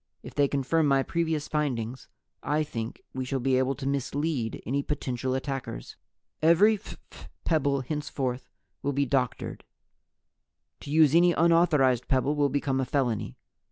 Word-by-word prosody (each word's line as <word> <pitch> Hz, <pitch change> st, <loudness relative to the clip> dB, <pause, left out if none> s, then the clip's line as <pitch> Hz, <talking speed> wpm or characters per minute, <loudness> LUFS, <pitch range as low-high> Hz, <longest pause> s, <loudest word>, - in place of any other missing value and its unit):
If -, -, -9 dB
they 145 Hz, -1 st, +3 dB
confirm 145 Hz, +3 st, +1 dB
my 135 Hz, -1 st, +3 dB
previous 160 Hz, -2 st, -1 dB
findings, 130 Hz, -5 st, -2 dB, 0.3 s
I 150 Hz, +1 st, 0 dB
Think 115 Hz, -6 st, -6 dB
We 130 Hz, -, -3 dB
shall 135 Hz, +1 st, -2 dB
be 130 Hz, 0 st, +2 dB
able 130 Hz, +1 st, +1 dB
to 135 Hz, -, -7 dB
mislead 140 Hz, -2 st, -1 dB
any 140 Hz, +4 st, 0 dB
potential 130 Hz, -3 st, -2 dB
attackers. 130 Hz, -, -5 dB, 0.5 s
"Every 170 Hz, +7 st, +5 dB
phph 205 Hz, -, -12 dB, 0.2 s
pebble 140 Hz, -4 st, +1 dB
henceforth 130 Hz, -3 st, -3 dB, 0.3 s
will 140 Hz, +1 st, -1 dB
be 140 Hz, +1 st, +1 dB
doctored. 125 Hz, -2 st, -2 dB, 1.2 s
To -, -, -10 dB
use 155 Hz, -1 st, +5 dB
any 175 Hz, +1 st, +5 dB
unauthorized 160 Hz, -7 st, +3 dB
pebble 130 Hz, +1 st, +2 dB
will 145 Hz, -1 st, +2 dB
become 135 Hz, -1 st, 0 dB
a -, -, -1 dB
felony. 120 Hz, -, -1 dB
140 Hz, 145 wpm, -27 LUFS, 130-150 Hz, 1.2 s, Every